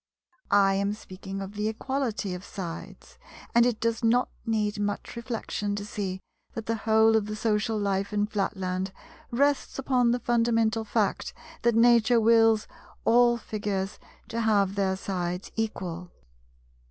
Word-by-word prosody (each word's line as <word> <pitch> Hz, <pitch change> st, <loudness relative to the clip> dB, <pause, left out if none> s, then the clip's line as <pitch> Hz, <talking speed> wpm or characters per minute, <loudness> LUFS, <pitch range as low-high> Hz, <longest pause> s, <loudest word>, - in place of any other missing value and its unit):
I 195 Hz, -1 st, +5 dB
am 200 Hz, +1 st, 0 dB
speaking 195 Hz, -1 st, -8 dB
of 195 Hz, +1 st, -8 dB
the 210 Hz, 0 st, -1 dB
equality 230 Hz, -4 st, -2 dB
of 180 Hz, +1 st, -6 dB
sides, 175 Hz, -5 st, -8 dB, 0.3 s
and 235 Hz, +1 st, +5 dB
it 240 Hz, -3 st, -1 dB
does 230 Hz, +1 st, -1 dB
not 240 Hz, +2 st, +3 dB, 0.2 s
need 210 Hz, -2 st, 0 dB
much 205 Hz, 0 st, -3 dB
reflection 225 Hz, -3 st, -3 dB
to 205 Hz, 0 st, -4 dB
see 190 Hz, -3 st, -4 dB, 0.3 s
that 225 Hz, -, -5 dB
the 230 Hz, -, 0 dB
whole 220 Hz, 0 st, +4 dB
of 215 Hz, -2 st, +1 dB
the 215 Hz, -, -4 dB
social 215 Hz, 0 st, 0 dB
life 200 Hz, -1 st, -1 dB
in 205 Hz, 0 st, +1 dB
Flatland 190 Hz, -3 st, -2 dB, 0.4 s
rests 280 Hz, +3 st, +1 dB
upon 255 Hz, -3 st, +2 dB
the 240 Hz, -, +2 dB
fundamental 230 Hz, -2 st, +1 dB
fact 215 Hz, -, -1 dB, 0.3 s
that 235 Hz, -1 st, +2 dB
Nature 235 Hz, 0 st, +5 dB
wills 225 Hz, -1 st, +4 dB, 0.4 s
all 240 Hz, +1 st, +5 dB
Figures 205 Hz, -3 st, -3 dB, 0.3 s
to 230 Hz, -, -2 dB
have 200 Hz, -3 st, +2 dB
their 195 Hz, -1 st, 0 dB
sides 180 Hz, -1 st, -4 dB
equal. 180 Hz, -6 st, -3 dB
215 Hz, 145 wpm, -27 LUFS, 195-230 Hz, 0.4 s, I